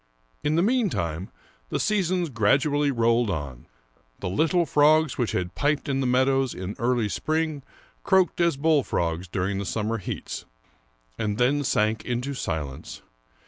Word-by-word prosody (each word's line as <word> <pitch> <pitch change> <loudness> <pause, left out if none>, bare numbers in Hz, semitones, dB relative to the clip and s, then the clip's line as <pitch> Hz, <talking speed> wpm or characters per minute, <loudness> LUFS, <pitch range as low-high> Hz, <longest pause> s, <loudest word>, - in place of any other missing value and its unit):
In 150 +1 +1
the 170 - +3
meantime, 130 - 0 0.4
the - - -1
seasons 185 -5 +1
gradually 140 +6 +2
rolled 115 -2 +2
on. 70 -9 -5 0.5
The - - -4
little 165 - +2
frogs 155 0 +4
which 120 -3 -1
had 90 -1 -2
piped 145 +1 0
in 135 -1 0
the 130 - 0
meadows 130 +1 +2
in 95 +2 -5
early 120 -2 +1
spring 155 +5 -1 0.4
croaked 190 -3 +3
as 170 -5 +2
bullfrogs 105 - +1
during 95 +2 -2
the - - -2
summer 110 +3 -2
heats, 95 - -6 0.7
and 105 -1 -1
then 135 +4 +2
sank 110 -3 +1
into 125 +3 -2
silence. 75 - -5
125 Hz, 140 wpm, -25 LUFS, 100-155 Hz, 0.7 s, frogs